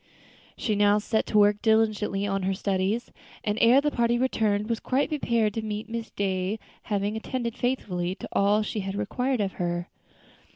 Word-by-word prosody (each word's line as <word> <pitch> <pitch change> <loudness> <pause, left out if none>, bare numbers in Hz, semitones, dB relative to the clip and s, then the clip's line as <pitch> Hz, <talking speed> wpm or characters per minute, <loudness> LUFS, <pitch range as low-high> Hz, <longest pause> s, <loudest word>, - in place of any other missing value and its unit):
She 220 - -1
now 205 0 +4
set 220 +1 0
to 215 - +1
work 205 0 +4
diligently 215 -3 +2
at 195 -1 -1
her 190 +1 0
studies, 195 +4 -1 0.3
and 210 +1 -1
ere 240 +4 +7
the 295 0 0
party 235 -1 +2
returned 215 -5 +1
was 230 -1 -1
quite 265 +3 0
prepared 235 -8 +1
to 225 - -2
meet 215 +1 -5
Miss 230 0 -4
Day, 190 +1 -1 0.3
having 205 0 -1
attended 235 +1 -3
faithfully 190 -9 -1
to - - -8
all 205 +2 +3
she 215 - -3
had 195 0 -4
required 250 +4 -1
of 195 -1 0
her. 175 0 -2
210 Hz, 175 wpm, -26 LUFS, 200-230 Hz, 0.3 s, ere